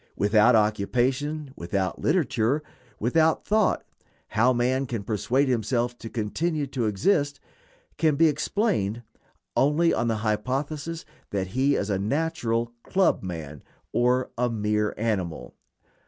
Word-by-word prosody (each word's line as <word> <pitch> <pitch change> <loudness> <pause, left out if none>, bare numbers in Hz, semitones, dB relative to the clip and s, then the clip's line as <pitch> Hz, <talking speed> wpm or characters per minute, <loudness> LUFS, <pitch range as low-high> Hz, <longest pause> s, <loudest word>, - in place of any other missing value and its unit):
Without 105 +4 +4
occupation, 130 +8 0
without 95 +2 -2
literature, 145 -4 +1 0.4
without 160 +8 +2
thought, 215 -1 +2 0.5
how 120 +4 +3
man 130 +2 +1
can 115 -4 -4
persuade 110 +7 +1
himself 120 0 0
to 115 - -7
continue 145 +9 -1
to 130 -4 -2
exist 145 - +1 0.6
can 155 -3 +3
be 165 +3 +4
explained 150 - 0 0.5
only 150 +5 +3
on 120 - 0
the 115 - +1
hypothesis 140 +9 -2 0.2
that 95 -2 -2
he 135 +7 +2
is 100 +1 -1
a 95 - 0
natural 120 -2 -1
"club 190 +8 +2
man," 80 -6 -6 0.3
or 125 +1 +2
a 125 0 +2
mere 105 -1 0
animal. 100 -7 -2
120 Hz, 125 wpm, -26 LUFS, 105-145 Hz, 0.6 s, Without